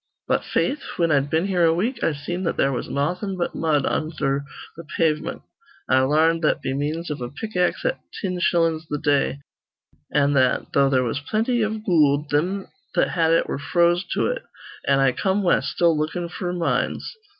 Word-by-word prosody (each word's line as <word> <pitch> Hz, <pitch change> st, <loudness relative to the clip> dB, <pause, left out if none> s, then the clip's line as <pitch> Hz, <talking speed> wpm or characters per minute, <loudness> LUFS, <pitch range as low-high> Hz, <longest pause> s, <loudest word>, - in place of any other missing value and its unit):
"But, -, -, +1 dB
faith, 285 Hz, -, 0 dB, 0.2 s
whin 170 Hz, -2 st, +2 dB
I'd 140 Hz, -1 st, +2 dB
been 160 Hz, +4 st, +1 dB
here 185 Hz, -3 st, +1 dB
a 165 Hz, 0 st, +4 dB
week, 230 Hz, +9 st, -2 dB
I -, -, +3 dB
seen 160 Hz, +5 st, -4 dB
that -, -, -1 dB
there 140 Hz, -, +2 dB
was 125 Hz, -, -4 dB
nawthin' 180 Hz, +7 st, -2 dB
but 175 Hz, -, -2 dB
mud 150 Hz, -4 st, +1 dB
undher 140 Hz, -3 st, -1 dB, 0.3 s
th' 165 Hz, 0 st, -11 dB
pavement, 155 Hz, -2 st, 0 dB, 0.4 s
I 130 Hz, -, +4 dB
larned 155 Hz, +5 st, +3 dB
that 155 Hz, -, +2 dB
be 130 Hz, -, -3 dB
means 155 Hz, +4 st, -2 dB
iv 145 Hz, -3 st, -5 dB
a 120 Hz, -, -4 dB
pick 215 Hz, -, -7 dB
axe 180 Hz, 0 st, +1 dB
at -, -, 0 dB, 0.2 s
tin 185 Hz, -3 st, -2 dB
shillin's 165 Hz, -2 st, +1 dB
th' 150 Hz, -, -3 dB
day, 140 Hz, -1 st, +1 dB, 0.7 s
an' 145 Hz, -1 st, +3 dB
that, 130 Hz, -2 st, +1 dB
though 140 Hz, -1 st, +4 dB
there 130 Hz, -2 st, +2 dB
was 120 Hz, +3 st, -2 dB
plenty 225 Hz, -, 0 dB
iv 215 Hz, 0 st, -2 dB
goold, 150 Hz, -4 st, +3 dB
thim 185 Hz, +7 st, 0 dB, 0.3 s
that -, -, +3 dB
had 165 Hz, -2 st, +2 dB
it 165 Hz, -, +3 dB
were -, -, -3 dB
froze 175 Hz, +4 st, +2 dB
to -, -, +1 dB
it; -, -, -1 dB, 0.5 s
an' 140 Hz, 0 st, +4 dB
I 135 Hz, -1 st, +4 dB
come 190 Hz, +8 st, 0 dB
west, 175 Hz, -, +2 dB
still 170 Hz, -2 st, +3 dB
lookin' 160 Hz, +3 st, -2 dB
f'r 175 Hz, 0 st, -4 dB
mines. 170 Hz, -, -1 dB
160 Hz, 195 wpm, -23 LUFS, 145-180 Hz, 0.7 s, a